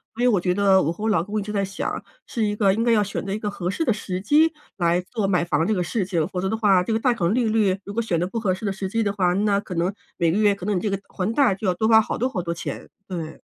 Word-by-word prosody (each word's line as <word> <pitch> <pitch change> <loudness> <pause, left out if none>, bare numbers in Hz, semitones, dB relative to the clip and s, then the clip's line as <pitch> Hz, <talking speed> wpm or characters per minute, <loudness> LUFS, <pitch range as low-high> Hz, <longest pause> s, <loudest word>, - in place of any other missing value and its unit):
所 240 - -2
以 - - +5
我 210 -7 +3
觉 180 0 +1
得 195 -1 +4
我 155 - 0
和 175 +5 -7
我 220 - +1
老 170 -6 +2
公 210 +3 -3
一 - - -3
直 210 - -6
在 200 -1 0
想， 195 0 -4 0.2
是 230 - -2
一 205 -1 0
个 200 -2 +3
应 225 +3 0
该 235 - +3
要 215 -2 +4
选 195 - -4
择 195 - -5
一 200 - -1
个 215 -1 -3
合 180 -3 -3
适 320 - -1
的 235 - +3
时 185 -3 -4
机 300 +11 +4 0.3
来 170 -1 +2
做 200 +2 -3
买 180 -3 +1
房 160 -1 +1
这 - - +1
个 180 -3 0
事 200 +4 -1
情， 170 -4 -1
否 180 -1 -3
则 190 - -1
的 220 - -1
话， 200 -4 +4
这 205 - -3
个 220 - +2
贷 250 +1 +2
款 175 -6 0
利 250 -1 +2
率 210 -3 +2
如 200 - -7
果 230 - 0
选 180 -7 -1
得 175 - 0
不 210 +5 -3
合 200 -4 +1
适 200 - -7
的 200 - 0
时 190 0 -4
机 225 +3 0
的 200 -1 0
话， 180 -3 +2
那 200 +1 +2
可 195 -3 -7
能 175 +4 0 0.2
每 170 -1 +2
个 195 - 0
月 205 -2 +4
可 185 - -8
能 210 0 0
你 - - -2
这 215 - -1
个 195 -1 -2
还 190 +2 -2
贷 265 -5 +4
就 190 +2 -4
要 185 - +3
多 220 +4 +1
花 220 0 +7
好 - - -3
多 250 - +1
好 225 -8 -3
多 170 -1 -3
钱， - - -6 0.2
对。 165 -4 -6
200 Hz, 365 characters per minute, -23 LUFS, 180-220 Hz, 0.3 s, 花